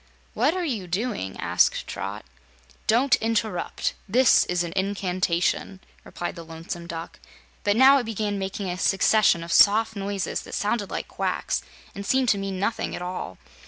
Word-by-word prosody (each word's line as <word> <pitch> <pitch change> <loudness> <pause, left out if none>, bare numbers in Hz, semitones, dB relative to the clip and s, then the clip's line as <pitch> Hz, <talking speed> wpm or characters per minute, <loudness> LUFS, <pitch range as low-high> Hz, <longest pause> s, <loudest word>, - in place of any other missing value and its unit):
"What 275 - +2
are 365 -1 -1
you 220 - -3
doing?" 180 - -3
asked - - +2
Trot. - - -6 0.6
"Don't 250 +3 +4
interrupt. 220 -5 -1 0.2
This 250 +4 +5
is 180 0 0
an 170 - -5
incantation," 185 -1 -1 0.2
replied 175 - -5
the 170 - -8
Lonesome 165 +1 -7
Duck, 165 -1 -7 0.4
but 205 0 +2
now 270 +2 +7
it 245 - -4
began 210 -2 -2
making 195 +1 -4
a 180 0 -4
succession 195 -3 +3
of 170 - -3
soft 220 +2 +5
noises 200 -1 -3
that - - -8
sounded 205 -1 -1
like - - -4
quacks - - -2 0.3
and 200 - -6
seemed 260 +4 +2
to 200 - +3
mean 195 -1 -4
nothing 220 +4 -1
at 175 - -6
all. 180 - -5
200 Hz, 160 wpm, -25 LUFS, 180-225 Hz, 0.6 s, now